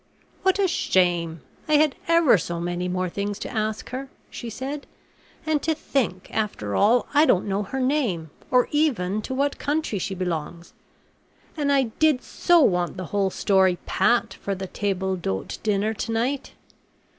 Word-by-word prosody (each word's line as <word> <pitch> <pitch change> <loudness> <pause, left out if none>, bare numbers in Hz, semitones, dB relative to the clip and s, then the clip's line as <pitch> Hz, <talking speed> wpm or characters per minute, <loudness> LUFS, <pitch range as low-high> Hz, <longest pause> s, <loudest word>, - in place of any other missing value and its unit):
"What 380 0 +3
a 400 -1 +3
shame! 175 - +1 0.3
I 305 - +1
had 300 -1 +4
ever 335 -6 +5
so 170 0 -4
many 175 +1 -2
more 185 0 -1
things 200 +3 -3
to - - -6
ask 215 +1 -2
her," 265 +2 -5 0.2
she 240 - -6
said, 270 +6 -5 0.6
"and 310 -2 +1
to 320 0 0
think, 240 - -2
after 200 - -2
all, 230 +4 +4
I 300 +2 +5
don't 190 - +3
know 195 +1 0
her 210 +7 -4
name, 250 - 0 0.2
or 250 -1 +4
even 220 -10 +1
to 260 - -5
what 280 +1 0
country 290 -8 -1
she 190 +1 -3
belongs, 170 -2 -4 0.8
and 290 -3 0
I 275 -1 +4 0.2
did 310 -5 +3
so 350 -2 +3
want 180 - +2
the 185 - -4
whole 200 -1 +2
story 190 -2 +2
pat 240 0 +2
for 200 - -4
the 190 0 -5
table 190 -1 -1
d'hote 95 - -4
dinner 210 +1 +1
to 225 - -4
night... 250 +5 -1
215 Hz, 170 wpm, -24 LUFS, 185-280 Hz, 0.8 s, ever